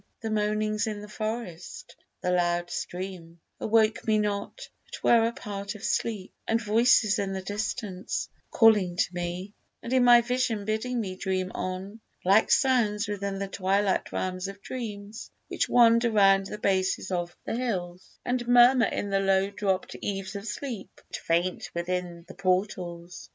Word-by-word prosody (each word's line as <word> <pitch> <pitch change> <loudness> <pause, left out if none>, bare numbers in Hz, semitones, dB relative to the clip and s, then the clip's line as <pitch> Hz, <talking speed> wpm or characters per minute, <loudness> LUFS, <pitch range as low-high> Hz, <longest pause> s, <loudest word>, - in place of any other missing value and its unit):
The 225 -1 -3
moanings 215 0 0
in 210 -1 -3
the 210 - -9
forest, 215 -5 -6 0.3
the 180 - 0
loud 175 -1 +1
stream, 175 -2 -6 0.2
Awoke 220 0 +2
me 215 -1 +3
not, 210 - -3 0.2
but - - -10
were 230 -1 +5
a - - -1
part 205 -3 -6
of 210 - -11
sleep; 210 -5 -2
And 225 - +2
voices 225 -1 +3
in 195 -1 -2
the 190 -1 -4
distance, 205 -1 -3 0.2
calling 210 -6 +4
to 180 - 0
me, 175 +3 -4 0.3
And 235 - -4
in 255 -1 +4
my 240 -1 +8
vision 235 -4 -1
bidding 220 +4 -1
me 190 -4 -4
dream 185 -1 -2
on, 190 +4 -5 0.3
Like 200 +4 +5
sounds 230 -6 +2
within 200 -1 -3
the 195 0 -3
twilight 195 +1 0
realms 185 0 -3
of 195 0 -10
dreams, 215 -3 -7 0.2
Which - - -1
wander 235 0 +5
round 195 -3 +4
the 210 - -6
bases 190 -1 0
of 175 -1 -3
the - - -2
hills, 185 -7 -4
And 245 -1 -1
murmur 245 0 +6
in 205 - -3
the 195 - +2
low 195 0 +2
dropt 195 -2 -2
eaves 195 0 -4
of 200 +2 -6
sleep, 240 -8 -5
But - - -9
faint 175 +2 -1
within 175 -1 -3
the 190 - -10
portals. 180 -3 -2
200 Hz, 160 wpm, -27 LUFS, 185-225 Hz, 0.3 s, my